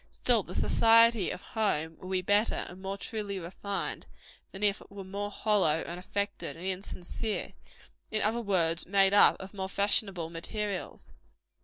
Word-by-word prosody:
Still, - - +2
the - - -10
society 230 -3 +5
of - - -5
home 165 -8 -1
will 185 - -9
be 185 -1 0
better 205 +4 +2
and 185 +1 -11
more 195 +1 -4
truly 205 -2 -4
refined, 190 +3 -5 0.4
than 195 +2 -7
if 205 0 +2
it - - -15
were 200 0 -8
more 200 +2 -4
hollow, 200 -7 +1
and 175 +1 -6
affected, 200 -1 -4
and 175 - -8
insincere 190 +3 -4 0.6
in 215 -1 0
other 225 +3 +1
words, 175 -5 +1
made 195 +1 +4
up 205 - +7
of 190 +1 -9
more 190 -1 -4
fashionable 195 -4 +2
materials. 200 +3 -5
195 Hz, 160 wpm, -29 LUFS, 185-210 Hz, 0.6 s, up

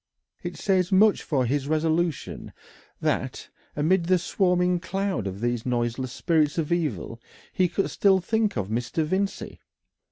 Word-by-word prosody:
It - - -6
says 185 -2 +1
much 205 +2 +5
for 135 -5 0
his 140 +3 -1
resolution 160 +1 -1 0.5
that, - - -2 0.3
amidst 170 +4 +1
the 185 - +5
swarming 180 0 +1
cloud 190 - -2
of 95 +2 -6
these 120 -1 -1
noiseless 125 +1 -1
spirits 155 +1 +1
of 160 -2 -1
evil, 155 -8 -2 0.3
he 185 - +3
could 195 - -1
still 195 -2 +4
think 215 - 0
of 100 -1 -2
Mr. 120 +8 -1
Vincey. 190 +5 -2
165 Hz, 140 wpm, -25 LUFS, 130-185 Hz, 0.5 s, much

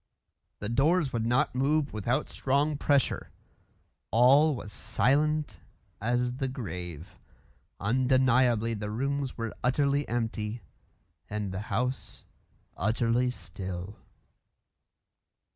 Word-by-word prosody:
The 100 - -5
doors 145 +5 +2
would 115 -1 0
not 120 +2 +2
move 140 +3 +1
without 120 +7 0
strong 140 +3 0
pressure. 140 -2 +1 0.8
All 135 +6 +5
was 105 -4 -8
silent 145 - +1 0.4
as 120 +2 0
the 135 -1 -1
grave. 90 - -7 0.6
Undeniably 125 0 +3
the 105 -1 -4
rooms 135 +4 -2
were 115 -2 -3
utterly 140 +2 +2
empty, 115 -1 -2 0.7
and 105 -2 -3
the 95 - -4
house 125 +6 -2 0.5
utterly 115 +5 +1
still. 95 -1 -6
125 Hz, 95 wpm, -29 LUFS, 105-135 Hz, 0.8 s, All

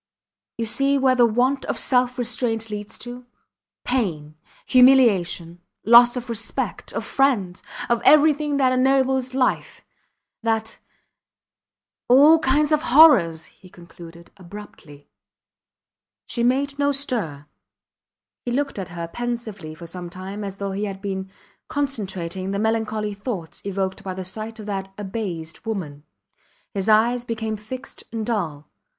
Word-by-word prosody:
You 230 - -2
see 275 +5 +1
where 265 -1 +3
the 245 -2 +5
want 250 +5 +1
of - - -2
self 250 0 +2
restraint 225 -2 -2
leads 210 0 -6
to. 245 +1 -9 0.6
Pain 170 - -2 0.3
humiliation 200 -10 +4 0.2
loss 240 +2 +7
of 250 0 -5
respect 230 -1 -3
of - - -3
friends, 220 -10 0 0.3
of 235 -1 +1
everything 300 -1 +4
that 260 -2 +3
ennobles 260 0 +1
life, 260 -1 -1 0.6
that... 225 -1 -2 1.3
All 290 +6 +7
kinds 295 +2 +2
of 305 -1 +3
horrors, 260 - +5
he 185 - -18
concluded, 170 -1 -14
abruptly. 170 -6 -12 1.2
She 235 - -3
made 275 +3 +1
no 285 0 +2
stir. 225 - -3 1.0
He - - -4
looked 275 -1 -2
at 185 -2 -5
her 170 -1 -6
pensively 220 -7 -5
for 170 - -10
some 175 +1 -8
time 190 +4 -7
as 195 -1 -5
though 200 0 -4
he 200 +2 -2
had 195 -2 -6
been 190 -1 -4 0.4
concentrating 195 -10 -3
the 200 - -2
melancholy 220 -1 -1
thoughts 200 -5 -6
evoked 190 -1 -3
by 185 -1 -5
the 190 0 -6
sight 220 +4 -6
of 215 - -9
that 195 -2 -4
abased 190 -6 -5
woman. 160 -10 -5 0.7
His 195 +1 -2
eyes 235 +3 +3
became 225 -2 -3
fixed 250 +6 -9
and 225 -1 -3
dull. 165 -11 -3
220 Hz, 135 wpm, -22 LUFS, 190-255 Hz, 1.3 s, loss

